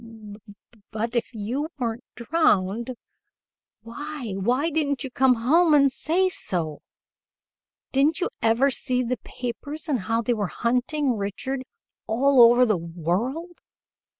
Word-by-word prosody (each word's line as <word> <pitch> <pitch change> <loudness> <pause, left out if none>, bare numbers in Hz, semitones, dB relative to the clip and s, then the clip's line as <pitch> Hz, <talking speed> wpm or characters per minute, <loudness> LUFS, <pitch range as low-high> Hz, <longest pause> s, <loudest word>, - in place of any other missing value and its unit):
"B 220 -2 -12
b 205 +3 -19 0.2
ut 230 +3 -2
if 235 - -1
you 245 +7 -3
weren't 240 -1 -3
drowned, 235 - +1 0.9
why 275 +1 -6
why 250 - 0
didn't 285 -3 -1
you 265 - -6
come 260 0 +4
home 305 +8 +4
and 280 -2 +5
say 350 +8 +1
so? 165 - -3 1.1
Didn't 285 +4 +2
you 365 - 0
ever 235 +5 +3
see 255 0 0
the 250 +1 -2
papers 285 +6 -6
and 280 -5 0
how 225 +4 -1
they 240 - +1
were 210 -4 -1
hunting 250 +4 0
Richard 230 +7 -4 0.4
all 260 +3 +4
over 240 +2 +7
the 215 -5 +1
world? 185 - -3
245 Hz, 135 wpm, -24 LUFS, 225-285 Hz, 1.1 s, over